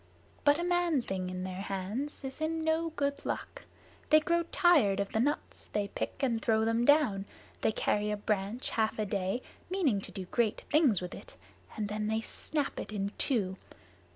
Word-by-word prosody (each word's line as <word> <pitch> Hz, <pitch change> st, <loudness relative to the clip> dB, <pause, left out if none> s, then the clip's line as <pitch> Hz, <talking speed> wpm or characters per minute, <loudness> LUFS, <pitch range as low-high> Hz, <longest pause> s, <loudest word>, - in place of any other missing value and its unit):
But 290 Hz, 0 st, +5 dB
a 340 Hz, -, -2 dB
man 350 Hz, -6 st, +2 dB
thing 185 Hz, -3 st, -3 dB
in 185 Hz, 0 st, -4 dB
their 185 Hz, 0 st, -4 dB
hands 200 Hz, +11 st, -3 dB
is 265 Hz, +3 st, -6 dB
in 320 Hz, +1 st, 0 dB
no 320 Hz, +1 st, +1 dB
good 280 Hz, 0 st, -1 dB
luck. -, -, -4 dB, 0.4 s
They 310 Hz, -, +8 dB
grow 340 Hz, +2 st, +2 dB
tired 285 Hz, -, +4 dB
of 200 Hz, 0 st, -1 dB
the 220 Hz, -, 0 dB
nuts 285 Hz, +5 st, -1 dB
they 205 Hz, -1 st, -1 dB
pick, -, -, -4 dB
and 235 Hz, -4 st, +1 dB
throw 220 Hz, 0 st, +2 dB
them 230 Hz, +1 st, +2 dB
down. 265 Hz, -10 st, +4 dB, 0.4 s
They -, -, +3 dB
carry 210 Hz, 0 st, 0 dB
a 210 Hz, -, -1 dB
branch 205 Hz, +3 st, -1 dB
half 220 Hz, -1 st, +1 dB
a 215 Hz, -, 0 dB
day, 195 Hz, +4 st, -1 dB, 0.3 s
meaning 315 Hz, -, +1 dB
to -, -, -7 dB
do 190 Hz, -, -5 dB
great 220 Hz, +3 st, 0 dB
things 280 Hz, -, +4 dB
with 180 Hz, 0 st, -5 dB
it, -, -, -11 dB, 0.4 s
and 210 Hz, -1 st, -1 dB
then 210 Hz, +1 st, -2 dB
they 220 Hz, +1 st, 0 dB
snap 290 Hz, +5 st, -2 dB
it -, -, -6 dB
in 200 Hz, -1 st, -2 dB
two. 195 Hz, -8 st, +1 dB
225 Hz, 190 wpm, -31 LUFS, 200-290 Hz, 0.4 s, They